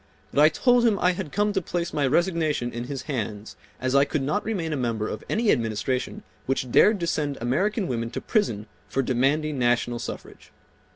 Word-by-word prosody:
But 145 - +4
I 155 - +8
told 245 +7 +3
him 225 -4 +3
I 180 -1 +3
had 180 -4 -5
come 205 0 +1
to 190 - 0
place 170 0 -3
my 145 -3 +1
resignation 155 -5 +1
in 120 +1 -4
his 135 0 -5
hands 110 -7 -4 0.2
as 130 0 -1
I 140 0 +6
could 140 0 -2
not 175 +10 0
remain 175 -8 -2
a - - 0
member 115 -5 -1
of - - -5
any 225 -1 +2
administration 115 +1 -1 0.2
which 130 -1 -1
dared 210 - +5
to - - 0
send 145 -4 -1
American 190 - 0
women 115 -2 -2
to - - -4
prison 115 - 0 0.2
for 135 - 0
demanding 140 +4 +1
national 120 0 +1
suffrage. - - -8
145 Hz, 195 wpm, -25 LUFS, 120-180 Hz, 0.2 s, I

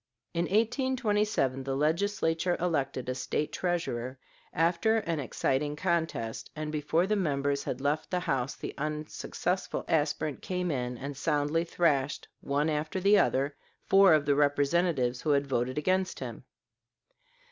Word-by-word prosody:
In 170 0 0
1827 215 - +1
the 135 0 -2
Legislature 165 +2 +1
elected 145 -7 -1
a 130 - 0
State 150 +3 -2
treasurer 135 -9 -2 0.3
after 170 +7 +2
an 165 -7 -1
exciting 145 +2 -1
contest, 160 -9 -2
and 155 0 -4
before 155 +3 +1
the 210 +2 +1
members 140 -6 0
had 125 - -3
left 145 +3 -1
the 180 -1 0
house 135 -5 -1
the - - -6
unsuccessful 155 +4 -3
aspirant 150 -1 0
came 180 -2 -2
in 125 -3 -2
and 140 +3 -6
soundly 150 +3 +1
thrashed, 145 -5 0
one 145 +2 0
after 155 +4 -1
the 200 +2 +5
other, 140 +2 +1 0.3
four 195 -4 +7
of 150 -2 +1
the 145 - +3
representatives 145 -2 +2
who 155 - -2
had 140 -1 +3
voted 130 -1 -1
against 185 +4 +1
him. - - -7
155 Hz, 140 wpm, -29 LUFS, 140-180 Hz, 0.3 s, four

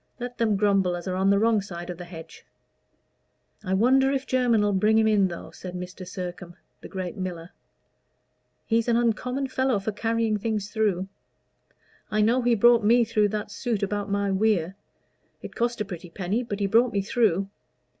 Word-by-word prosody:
Let 245 0 -6
them 220 -3 +2
grumble 195 -3 +2
as 175 +1 -7
are 185 - -1
on 190 +1 +2
the 200 - +4
wrong 220 0 +3
side 175 -2 -7
of 175 - -9
the 175 - -7
hedge." 165 -2 -11 1.2
"I 190 -1 0
wonder 265 +6 +4
if 270 -1 -1
Jermyn'll 230 -5 +2
bring 215 +2 +3
him 220 0 +4
in, 205 -3 +3
though," 170 -2 -8
said 180 -1 -9
Mr. 180 +1 -7
Sircome, 175 -1 -7 0.3
the - - -9
great 185 0 -5
miller. 180 -2 -5 1.1
"He's 230 0 +1
an 235 -1 +3
uncommon 250 +3 0
fellow 260 -3 +1
for 200 +2 -3
carrying 225 0 0
things 210 -1 -3
through. 200 -4 0 1.0
I 215 - +1
know 235 +4 +3
he 240 -1 +3
brought 235 +1 +5
me 235 +3 +5
through 215 -2 +2
that 210 0 -4
suit 225 -2 -2
about 205 0 -2
my 200 0 0
weir; 190 -3 +1 0.7
it - - -8
cost 235 0 -1
a - - -1
pretty 180 -2 -8
penny, 195 +6 -2
but 210 -4 -5
he 200 - +1
brought 230 +5 +3
me 200 -1 0
through." 200 -3 +1
210 Hz, 185 wpm, -25 LUFS, 185-230 Hz, 1.2 s, brought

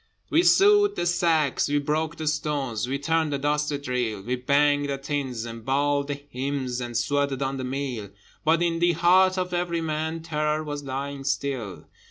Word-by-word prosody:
We 325 - +5
sewed 410 +2 +5
the - - -1
sacks, 165 -5 +2
we 145 - +2
broke 155 +3 -1
the 160 - -5
stones, 145 -7 -1
We 135 +2 -1
turned 160 +1 0
the 140 - 0
dusty 150 +1 0
drill: 125 -7 -2
We 125 +4 -1
banged 145 +2 +2
the 140 - -1
tins, 135 -4 -3
and 115 -1 -8
bawled 140 +2 +1
the 145 - -2
hymns, 135 -2 -4
And 120 -1 -3
sweated 140 +2 0
on 135 0 -2
the 130 - -4
mill: 130 -5 -4 0.3
But 165 +2 +3
in 165 -1 0
the 175 0 +3
heart 185 +3 +4
of 180 -1 -2
every 175 -1 -1
man 160 +1 -3
Terror 150 -1 -1
was 145 -1 -5
lying 140 +1 -4
still. 130 -8 -3
145 Hz, 185 wpm, -25 LUFS, 135-160 Hz, 0.3 s, We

